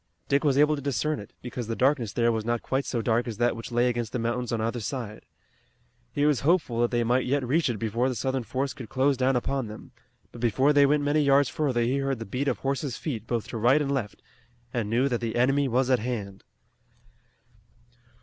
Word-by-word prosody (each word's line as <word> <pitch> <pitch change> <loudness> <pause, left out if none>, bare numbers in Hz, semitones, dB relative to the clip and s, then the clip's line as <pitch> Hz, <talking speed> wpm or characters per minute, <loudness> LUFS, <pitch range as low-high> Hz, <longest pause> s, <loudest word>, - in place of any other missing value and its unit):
Dick 140 0 +2
was 140 -3 +2
able 150 +1 +4
to 140 - -6
discern 145 +2 -1
it, 100 - -10
because 120 -2 -5
the 115 - -2
darkness 130 -4 +1
there 115 +3 +2
was 110 -1 -1
not 120 +1 -1
quite 135 +1 -1
so 115 -3 -2
dark 120 +1 +1
as 115 -3 -5
that 120 0 +2
which 115 +2 -8
lay 120 +1 +2
against 120 -3 -2
the - - 0
mountains 120 +1 -2
on 115 - -1
either 115 +2 -1
side. 110 -2 -6 0.8
He 145 - 0
was 150 -5 +3
hopeful 140 -6 +1
that 120 - +2
they 120 -1 +1
might 125 +2 +1
yet 135 -1 0
reach 155 +3 +2
it 120 - -2
before 115 +4 0
the 130 - -3
Southern 130 +1 -1
force 130 +3 -3
could 125 -4 -9
close 135 +1 +2
down 130 +1 +1
upon 130 0 -1
them, 105 0 -10 0.4
but 120 - -11
before 130 +5 +3
they 145 -1 +6
went 145 +1 +2
many 145 +1 +2
yards 140 -1 +4
further 130 -4 0
he 130 +4 +1
heard 135 -1 -1
the 115 - -6
beat 125 +7 -3
of 130 - +1
horses' 135 -1 -2
feet 115 -8 -5
both 115 -3 -2
to - - -4
right 125 +6 +4
and 140 -2 -1
left 125 -8 -3 0.5
and 115 -4 -1
knew 120 +5 +2
that 120 -3 -1
the 115 -2 -3
enemy 135 +3 +2
was 130 +1 +1
at 130 - +4
hand. 105 -5 -5
125 Hz, 230 wpm, -26 LUFS, 115-140 Hz, 0.8 s, they